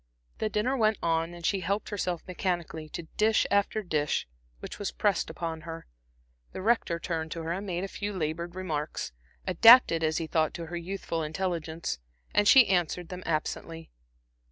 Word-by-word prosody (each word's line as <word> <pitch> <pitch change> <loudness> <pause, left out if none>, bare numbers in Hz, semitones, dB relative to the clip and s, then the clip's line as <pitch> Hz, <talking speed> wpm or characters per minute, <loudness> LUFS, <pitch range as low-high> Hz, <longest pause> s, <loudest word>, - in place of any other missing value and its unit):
The 215 - 0
dinner 215 +6 0
went 220 -3 +2
on, 165 +1 0
and 170 -1 -8
she 195 - +2
helped 195 +4 -2
herself 180 -5 -2
mechanically 175 -4 -3
to 170 - -6
dish 220 +1 +3
after 200 +2 +2
dish 150 - 0 0.3
which - - -8
was 205 - -2
pressed 205 -4 +1
upon 165 -2 -4
her. 165 0 -8 0.7
The - - -5
Rector 220 -6 +2
turned 165 -2 -3
to 165 - -5
her 165 - -3
and 195 +4 -3
made 180 0 -2
a - - -2
few 205 +1 -4
labored 170 -1 -3
remarks, 155 - -3 0.3
adapted 185 -2 +7
as 155 0 +1
he 165 - -1
thought 160 0 0
to 170 - -5
her 170 +2 -6
youthful 170 -1 -3
intelligence, 160 - -3 0.3
and 205 0 +3
she 265 0 +9
answered 175 -2 0
them 180 0 -6
absently. 165 +1 -3
175 Hz, 175 wpm, -29 LUFS, 165-200 Hz, 0.7 s, she